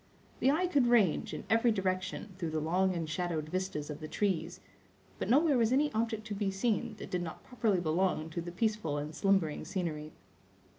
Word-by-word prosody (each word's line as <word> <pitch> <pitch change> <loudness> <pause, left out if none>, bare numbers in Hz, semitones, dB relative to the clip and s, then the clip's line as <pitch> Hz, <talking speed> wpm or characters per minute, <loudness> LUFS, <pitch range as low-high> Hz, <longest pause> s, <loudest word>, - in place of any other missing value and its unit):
The 265 - +4
eye 320 +6 +3
could 285 -8 +3
range, 220 -9 +3
in - - -5
every 230 +1 +4
direction, 190 0 -2
through 170 -4 -2
the 155 0 -1
long 180 +4 +1
and 165 -2 -2
shadowed 160 -1 -2
vistas 180 -5 -3
of 150 - -7
the 155 - -6
trees; 175 -3 -1 0.6
but - - -2
nowhere 285 +1 +4
was 230 0 +3
any 290 +3 +2
object 220 -1 -1
to 215 - -4
be 200 -1 -1
seen 220 +3 0
that - - -8
did 180 - 0
not 165 -2 -6
properly 225 -6 0
belong 165 -1 0
to 170 - -3
the 175 +1 -6
peaceful 200 -6 0
and 150 +2 -4
slumbering 190 -4 +1
scenery. 155 -5 -3
190 Hz, 195 wpm, -32 LUFS, 160-225 Hz, 0.6 s, The